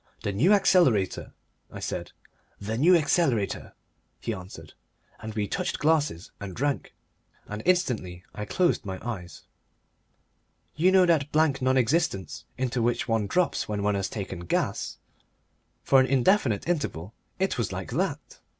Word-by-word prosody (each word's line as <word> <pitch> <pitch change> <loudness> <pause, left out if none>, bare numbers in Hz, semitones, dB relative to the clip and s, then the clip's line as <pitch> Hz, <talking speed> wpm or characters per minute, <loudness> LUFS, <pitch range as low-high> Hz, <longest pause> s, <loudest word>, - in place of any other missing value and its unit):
"The 100 - -1
New 130 - +3
Accelerator," 175 - +3 0.4
I - - -8
said. - - -4 0.5
"The 110 +2 -3
New 165 +10 +5
Accelerator," 145 - +1 0.5
he 115 - -3
answered, 90 -5 -10 0.5
and 110 0 -7
we 105 -2 -1
touched - - -2
glasses 150 - +1
and 95 -3 -7
drank, 140 +2 -2 0.5
and 105 +1 -6
instantly 115 - 0
I 105 - -5
closed 175 - +1
my 95 -3 -5
eyes. 90 -7 -6 1.3
You 175 +6 +4
know 190 -1 +6
that 155 -4 +2
blank 150 -3 +2
non 130 +1 +2
existence 115 - 0
into 125 -1 -1
which 120 +2 0
one 110 -3 +1
drops 180 - 0
when 105 -1 -2
one 105 0 +2
has 100 -1 -1
taken 95 -4 -5
"gas." 85 - -2 0.9
For 135 - +5
an 130 - +3
indefinite 135 - +2
interval 115 - -2 0.2
it 190 -8 -1
was 115 - -1
like - - -5
that. - - -3
120 Hz, 145 wpm, -27 LUFS, 100-155 Hz, 1.3 s, know